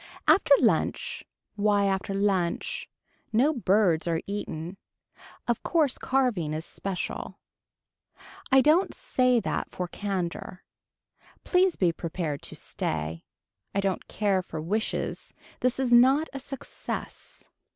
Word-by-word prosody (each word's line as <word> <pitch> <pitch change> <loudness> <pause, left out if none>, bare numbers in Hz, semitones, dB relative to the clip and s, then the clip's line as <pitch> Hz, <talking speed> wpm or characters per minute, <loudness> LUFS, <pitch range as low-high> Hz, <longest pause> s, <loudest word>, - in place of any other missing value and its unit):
After 285 -7 +6
lunch, 215 -10 +1 0.3
why 205 -1 +3
after 195 0 -1
lunch, 195 -4 0 0.4
no 260 +8 +3
birds 195 - +2
are 165 -1 +1
eaten. 190 -3 -5 0.7
Of 240 -2 0
course 310 -6 +1
carving 230 - +1
is 160 +2 -4
special. 195 -2 -4 1.1
I 265 0 +7
don't 315 +7 +3
say 250 -1 +2
that - - -2
for 180 - -4
candor. 185 -1 -4 0.8
Please 365 -1 +3
be 180 -3 +2
prepared 165 -3 -4
to - - -8
stay. 80 +1 -4 0.5
I - - +2
don't 195 -2 -1
care 200 -3 +1
for 160 -3 -7
wishes. 205 +8 -2 0.2
This 255 +1 +1
is 255 -2 +2
not 265 +6 +6
a 275 - -4
success. 275 0 -7
200 Hz, 120 wpm, -27 LUFS, 175-255 Hz, 1.1 s, I